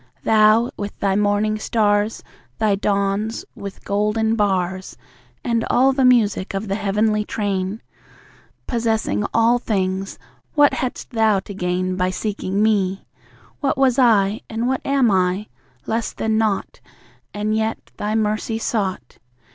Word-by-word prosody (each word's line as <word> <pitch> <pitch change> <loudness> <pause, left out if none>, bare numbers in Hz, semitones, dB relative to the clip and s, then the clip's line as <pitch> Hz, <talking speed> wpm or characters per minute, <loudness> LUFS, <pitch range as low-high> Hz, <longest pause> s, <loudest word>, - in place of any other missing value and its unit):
Thou, 220 +2 +4
with 205 0 -5
Thy 195 -1 +1
morning 210 +1 +1
stars, 210 -1 +1 0.3
Thy 215 -2 +2
dawns, 200 +2 -1
with 200 -1 -9
golden 210 +2 +1
bars, 190 -3 -1 0.5
And 230 -1 0
all 265 +2 +4
the 265 0 +1
music 215 -6 +3
of 200 +2 -3
the 195 - -1
heavenly 210 +1 +1
train. 200 -1 -3 0.8
Possessing 225 -3 0
all 230 +2 +3
things, 195 -3 -2 0.4
what 290 -1 +5
hadst 255 +1 -4
Thou 220 -4 +3
to 200 - -9
gain 185 0 -2
By 180 0 +1
seeking 200 0 -2
me? 195 -3 +1 0.5
What 275 -3 0
was 265 -1 +3
I?... 215 -4 +3
and, 230 +2 -2
what 265 0 0
am 275 -5 +2
I?... 185 +2 +1 0.4
less 225 +1 -2
than 220 0 -1
nought. 215 -3 -1 0.5
And 210 +1 -1
yet 220 0 -2
Thy 210 +1 -2
mercy 215 +1 0
sought. 205 -4 -3
210 Hz, 135 wpm, -21 LUFS, 195-225 Hz, 0.8 s, what